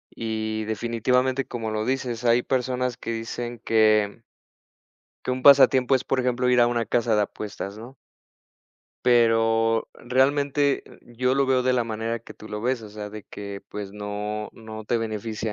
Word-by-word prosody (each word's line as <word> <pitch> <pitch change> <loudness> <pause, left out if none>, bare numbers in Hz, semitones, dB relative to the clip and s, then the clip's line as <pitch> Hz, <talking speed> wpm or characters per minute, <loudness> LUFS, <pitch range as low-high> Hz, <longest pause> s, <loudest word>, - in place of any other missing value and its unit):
Y, 110 -1 -3
definitivamente, 120 +4 0
como 115 -2 -4
lo 110 0 -2
dices, 125 -3 -2
hay 120 +1 +4
personas 125 -1 -1
que 115 - -5
dicen 120 +1 -5
que 110 0 +2 1.0
que - - -2
un 125 0 -2
pasatiempo 135 -2 +6
es, 130 - +1
por 135 - 0
ejemplo, 125 0 +1
ir 125 -1 +4
a 120 - +6
una 120 -1 0
casa 115 0 +1
de 105 - +3
apuestas, 100 0 -6
¿no? 125 +4 -11 1.1
Pero, 115 -1 +3
realmente, 140 +2 +1 0.2
yo 125 +2 -1
lo 140 0 +2
veo 130 -1 +2
de 130 - +2
la 120 -2 +1
manera 115 +1 -3
que 115 - -13
tú 110 - -12
lo 105 0 -4
ves, 125 0 -1
o 105 - -10
sea, 105 0 -7
de 105 0 -9
que, 100 0 -8
pues, 100 -1 -6
no 105 +1 -4
no 110 -1 -9
te 115 +2 0
beneficia 110 0 -3
115 Hz, 170 wpm, -25 LUFS, 110-125 Hz, 1.1 s, pasatiempo